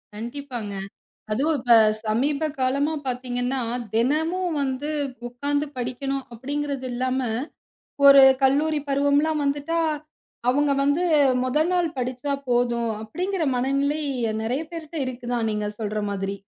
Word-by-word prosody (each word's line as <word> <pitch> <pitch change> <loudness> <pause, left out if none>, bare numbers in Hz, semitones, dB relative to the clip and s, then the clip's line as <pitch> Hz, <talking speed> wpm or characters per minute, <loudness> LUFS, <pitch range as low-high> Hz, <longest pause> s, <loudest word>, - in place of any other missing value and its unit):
கண்டிப்பாங்க. 235 -2 -6 0.6
அதுவும் 290 +7 +1
இப்ப 240 -1 +4 0.3
சமீபகாலமா 280 +4 0
பார்த்தீங்கன்னா, 250 +1 -2 0.3
தினமும் 320 +8 +1
வந்து 270 +2 -2 0.4
உக்காந்து 285 +4 -2
படிக்கணும் 265 +2 -3
அப்படிங்கறது 280 +1 -3
இல்லாம 255 +1 -1 0.9
ஒரு 275 -1 +10 0.2
கல்லூரி 295 +3 +2
பருவம்லாம் 285 +2 +2
வந்துட்டா 290 +4 0 0.7
அவுங்க 285 +2 +3
வந்து 285 +5 +2 0.4
முதல் 300 +6 +1
நாள் 350 -2 +2
படிச்சா 255 +3 -2 0.2
போதும் 240 -1 +1
அப்படிங்கிற 360 - -3
மனநிலை 275 +4 0 0.4
நெறைய 255 +7 -1
பேர்ட்ட 330 -1 -7
இருக்குதான் 245 -2 -2
நீங்க 210 0 -2
சொல்ற 215 0 -2
மாதிரி. 195 0 -3
275 Hz, 105 wpm, -24 LUFS, 245-295 Hz, 0.9 s, ஒரு